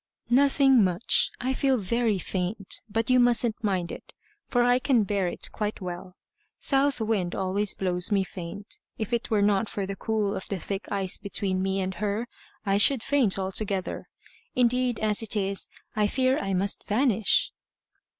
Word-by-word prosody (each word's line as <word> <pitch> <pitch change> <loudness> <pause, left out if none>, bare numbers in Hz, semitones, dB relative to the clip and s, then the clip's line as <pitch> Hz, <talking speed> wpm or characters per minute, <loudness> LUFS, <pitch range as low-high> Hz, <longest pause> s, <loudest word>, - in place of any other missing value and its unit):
"Nothing 270 -2 +5
much. 185 +4 +2
I 260 +2 -1
feel 265 -1 +2
very 225 +1 0
faint. 190 +2 -4
But 225 +3 0
you 255 - +5
mustn't 240 -1 +2
mind 185 -4 -1
it, - - -10 0.3
for 245 -1 +2
I 245 +1 +4
can 250 -4 +3
bear 195 -2 0
it - - -3
quite 210 0 -3
well. 180 0 -7 0.4
South 275 -1 +1
Wind 210 -6 -1
always 195 +2 0
blows 180 0 0
me 200 -2 +3
faint. 190 +2 -8 0.2
If 220 +2 -4
it 235 +1 -1
were 210 -3 +2
not 205 +1 +2
for 200 - -3
the 195 +1 -5
cool 210 -1 -1
of 190 - -6
the 195 - -3
thick 195 +4 -5
ice 195 -1 0
between 195 -2 -1
me 190 0 0
and 190 0 -2
her, 210 +3 -1 0.4
I 195 0 +2
should 245 +2 +4
faint 260 -10 +2
altogether. 190 0 -2 0.5
Indeed, 250 -1 +2
as 215 0 +1
it 225 -1 -1
is, 195 -1 -1 0.3
I 210 -1 +2
fear 260 +4 +1
I 195 -1 -2
must 195 +2 -1
vanish." 225 -1 +2
205 Hz, 170 wpm, -26 LUFS, 190-240 Hz, 0.5 s, Nothing